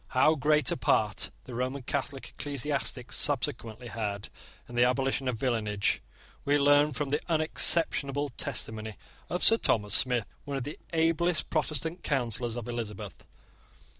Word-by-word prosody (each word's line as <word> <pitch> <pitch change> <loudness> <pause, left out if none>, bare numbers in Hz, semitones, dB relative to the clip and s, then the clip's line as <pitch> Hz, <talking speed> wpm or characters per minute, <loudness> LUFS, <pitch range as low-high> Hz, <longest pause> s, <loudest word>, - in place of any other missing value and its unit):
How 155 +4 +5
great 150 +1 +2
a - - -1
part 105 -4 +1
the 125 - -10
Roman 130 +3 -3
Catholic 140 +1 -4
ecclesiastics 140 -3 -2
subsequently 125 -4 -1
had 105 -3 -4 0.4
in 120 - -12
the 120 0 +3
abolition 135 +1 0
of 125 -3 -1
villenage 105 -5 0 0.4
we 145 +1 +2
learn 145 +1 +4
from 145 +1 -3
the 145 +2 0
unexceptionable 155 -3 +3
testimony 110 -2 -3 0.3
of 180 - -1
Sir 225 - +7
Thomas 105 - +1
Smith, 125 -4 +2 0.2
one 140 -1 -4
of 135 - -3
the 145 - -7
ablest 165 0 +1
Protestant 160 +2 -1
counsellors 120 -4 -1
of 120 -1 -6
Elizabeth. 115 -4 -6
135 Hz, 140 wpm, -29 LUFS, 120-145 Hz, 0.4 s, Sir